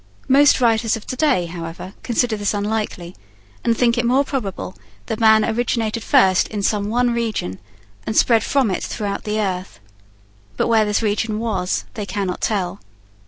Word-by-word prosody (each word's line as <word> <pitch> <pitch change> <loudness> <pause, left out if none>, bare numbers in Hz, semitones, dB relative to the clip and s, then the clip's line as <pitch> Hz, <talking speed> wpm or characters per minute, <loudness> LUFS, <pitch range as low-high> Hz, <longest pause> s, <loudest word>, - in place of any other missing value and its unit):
Most 280 +1 +5
writers 225 -2 +2
of 215 - -12
to - - -4
day, 250 - +2
however, 170 +2 -7
consider 240 -1 0
this 205 0 -1
unlikely, 205 -4 -3 0.5
and 230 -1 +1
think 240 -1 +2
it - - +1
more 255 +4 +3
probable 210 -9 -4 0.3
that 225 - -4
man 220 -1 +5
originated 230 -1 -1
first 185 -1 +4
in 205 -2 -4
some 205 0 0
one 245 +1 +1
region, 220 - -2 0.5
and 220 - -1
spread 230 -2 +4
from 265 -7 +1
it 185 - -2
throughout 200 -2 -4
the 215 0 -1
earth. 185 - -3 0.8
But - - +1
where 220 -2 +4
this 210 +2 0
region 215 +1 0
was, 200 -5 -2
they 210 -3 -5
cannot 195 -3 -3
tell. 190 - -1
215 Hz, 165 wpm, -20 LUFS, 200-235 Hz, 0.8 s, Most